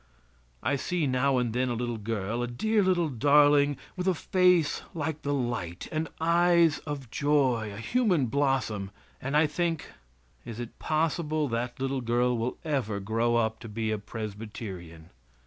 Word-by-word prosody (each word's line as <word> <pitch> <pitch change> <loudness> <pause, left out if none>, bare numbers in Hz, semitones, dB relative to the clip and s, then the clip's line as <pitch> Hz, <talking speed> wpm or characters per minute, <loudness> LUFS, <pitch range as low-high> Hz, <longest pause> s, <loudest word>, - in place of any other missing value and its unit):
I 140 - +1
see 175 +3 -1
now 130 0 +2
and 120 -3 0
then 125 +1 0
a 120 - -1
little 120 -1 -3
girl 110 +1 -2
a 120 - -1
dear 215 - +1
little 180 -3 +2
darling, 145 +2 +4 0.2
with 180 0 -3
a 185 - +3
face 180 -2 +3
like 155 -1 -3
the 145 - -2
light, 120 -11 -2
and 160 0 -2
eyes 170 -1 +4
of 140 -5 -5
joy, 130 -7 +1
a 100 - -8
human 180 - +1
blossom, 125 -6 0 0.3
and 140 +3 0
I 155 - +5
think, 165 +1 -2 0.5
"is 115 -1 -8
it 120 -1 -7
possible 155 -1 0
that 120 +2 -3
little 135 0 -1
girl 120 +1 +1
will 115 +2 -2
ever 130 -10 -1
grow 115 +4 0
up 110 -1 +1
to 115 - -9
be 110 +1 -2
a 110 - -1
Presbyterian?" 100 -6 -7
130 Hz, 165 wpm, -28 LUFS, 115-155 Hz, 0.5 s, I